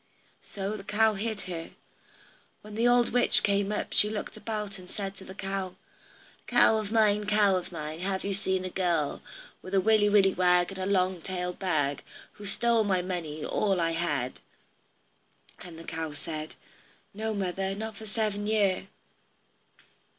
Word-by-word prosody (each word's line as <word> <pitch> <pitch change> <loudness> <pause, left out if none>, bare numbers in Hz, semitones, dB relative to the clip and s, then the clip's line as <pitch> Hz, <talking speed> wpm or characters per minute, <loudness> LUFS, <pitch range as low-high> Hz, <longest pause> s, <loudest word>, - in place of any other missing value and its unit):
So 200 +1 -4
the 200 - -8
cow 220 +2 +3
hid 215 +1 -3
her. 170 -3 -6 0.9
When 210 0 -10
the 230 +3 +2
old 245 0 +4
witch 245 +1 +4
came 200 0 +2
up, 210 - -3
she 210 - +6
looked 215 -1 -5
about 215 -2 -4
and 180 0 -13
said 195 -1 -5
to - - -11
the 190 - -10
cow: 195 -1 -4 0.7
"Cow 220 - +5
of 215 -1 -3
mine, 210 -2 +3
cow 205 -2 +4
of 180 0 -3
mine, 155 -1 -5
Have 190 +1 -2
you 200 - -1
seen 190 -1 -1
a 185 - -4
girl 170 -6 0 0.4
With 185 +1 -4
a - - +6
willy 210 +1 +4
willy 195 -2 +5
wag, 180 0 +3
and 190 - -7
a 185 - -1
long 185 -2 +1
tailed 180 0 -4
bag, 150 -7 0 0.3
Who's 205 -1 -7
stole 235 -2 +3
my 190 -3 +1
money, 165 -5 -4
all 195 -3 +1
I 165 -1 +1
had?" 150 -7 -2 1.2
And 175 -2 -10
the 165 - -9
cow 160 -2 -4
said, 155 0 -6 0.6
"No, 220 +1 -3
mother, 195 0 -2
not 220 +1 -5
for 220 +2 -10
seven 210 -2 -1
year." 200 -3 +2
195 Hz, 170 wpm, -28 LUFS, 180-210 Hz, 1.2 s, she